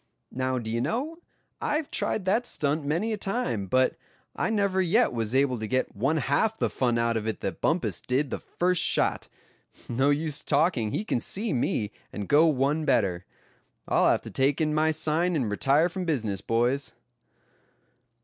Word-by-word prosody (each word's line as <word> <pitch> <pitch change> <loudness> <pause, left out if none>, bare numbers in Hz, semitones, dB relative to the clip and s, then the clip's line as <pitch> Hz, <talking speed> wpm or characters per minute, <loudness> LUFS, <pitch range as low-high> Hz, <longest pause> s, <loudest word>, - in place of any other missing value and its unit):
"Now, 130 0 -1
d'ye 115 -1 -2
know, 280 - -2 0.4
I've 300 0 -1
tried 200 - -1
that 220 +6 +1
stunt 150 +1 0
many 170 +10 -1
a - - -2
time, 195 - -2
but 130 +6 +2 0.4
I - - -1
never 200 -3 +1
yet 195 - +2
was 115 0 -2
able 135 -3 +2
to 110 - -4
get 130 +3 -1
one 135 +10 +1
half 155 +11 +1
the - - 0
fun 120 -2 0
out 115 0 +1
of 110 0 -3
it 110 - -3
that - - -4
Bumpus - - 0
did 130 +2 -1
the - - -3
first 180 -1 0
shot. - - +1 0.6
No 130 +4 +1
use 150 +1 0
talking, 145 -10 +1
he 205 - -3
can 125 - 0
see 205 - -1
me, 110 -4 -1 0.2
and 100 -2 -5
go 155 +3 +5
one 145 +1 +1
better. 95 -11 +1 0.6
I'll - - +3
have - - +2
to - - -9
take 135 +3 +1
in 155 -1 +1
my 155 +1 +2
sign, 160 +3 0
and 125 -8 -1
retire 140 +9 +3
from 180 +1 -5
business, 110 - -1
boys." 120 +6 0
145 Hz, 180 wpm, -27 LUFS, 120-180 Hz, 0.6 s, go